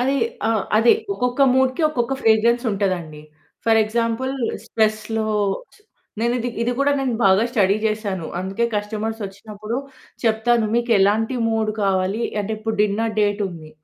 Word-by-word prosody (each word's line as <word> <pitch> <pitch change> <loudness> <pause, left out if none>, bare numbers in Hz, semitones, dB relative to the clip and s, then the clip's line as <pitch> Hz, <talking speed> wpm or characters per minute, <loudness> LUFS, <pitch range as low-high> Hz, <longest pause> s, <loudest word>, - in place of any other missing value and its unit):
అది 265 +3 +1 0.3
ఆ! - - +2 0.3
అదే 225 +2 +6 0.2
ఒక్కొక్క 250 -1 0
మూడ్‌కి 260 +4 +2
ఒక్కొక్క 250 -3 -1
ఫ్రేగ్రెన్స్ 230 +2 +3
ఉంటదండి. 180 -6 -2 0.4
ఫర్ 225 -1 +4
ఎగ్జాంపుల్ 230 +4 -1 0.3
స్ట్రెస్‌లో 220 0 0 0.5
చ్ - - -22 0.4
నేనిది 240 +1 0
ఇది 240 +1 0
కూడా 280 +1 +3
నేను 260 -3 -1
బాగా 190 +3 +5
స్టడీ 200 -4 +3
చేశాను. 205 -6 -2
అందుకే 195 +5 -1
కస్టమర్స్ 215 +2 -3
ఓచ్చినప్పుడు 210 +3 -7 0.5
చెప్తాను, 225 0 +2
"మీకెలాంటి 225 0 +2
మూడ్ 220 -1 0
కావాలి?" 195 +2 0 0.2
అంటే 205 +1 -4
ఇప్పుడు 220 0 -3
డిన్నర్ 215 +2 0
డేట్ 205 0 +1
ఉంది. 160 -3 -10
220 Hz, 135 wpm, -21 LUFS, 205-235 Hz, 0.5 s, అదే